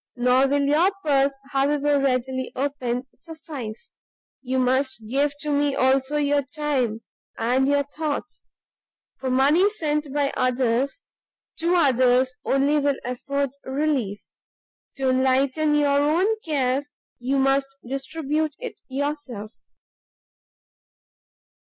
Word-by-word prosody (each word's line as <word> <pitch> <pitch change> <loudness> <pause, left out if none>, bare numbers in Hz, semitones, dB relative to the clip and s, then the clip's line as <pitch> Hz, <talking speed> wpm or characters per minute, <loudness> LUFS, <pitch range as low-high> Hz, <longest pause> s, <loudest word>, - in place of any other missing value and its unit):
Nor 250 +2 +3
will 285 +1 +1
your 300 +6 +4 0.2
purse, 275 -1 +2
however 285 +1 +2
readily 260 -1 -1
opened, 255 -2 -2
suffice, 300 -9 -8 0.5
you 260 0 -2
must 260 -2 0
give 280 +5 +1
to 300 - -2
me 285 -1 +1
also 265 +3 +2
your 290 -1 +2
time 270 -6 -2 0.4
and 250 +4 +2
your 285 0 +3
thoughts; 300 +5 -5 0.7
for 260 - -2
money 285 +10 +4
sent 300 -7 -2
by 285 0 0
others, 255 - 0 0.5
to 340 +2 +1
others 255 -4 +3
only 280 +2 +2
will 280 -1 +1
afford 275 +2 -2
relief; 265 -8 -1 0.7
to 265 -1 +1
enlighten 265 +4 +2
your 285 -1 +3
own 310 +6 +2 0.2
cares, 280 -2 -1 0.3
you 260 +3 0
must 270 0 +2 0.2
distribute 300 +3 -2
it - - -8
yourself." 270 -6 -4
275 Hz, 110 wpm, -24 LUFS, 260-295 Hz, 0.7 s, your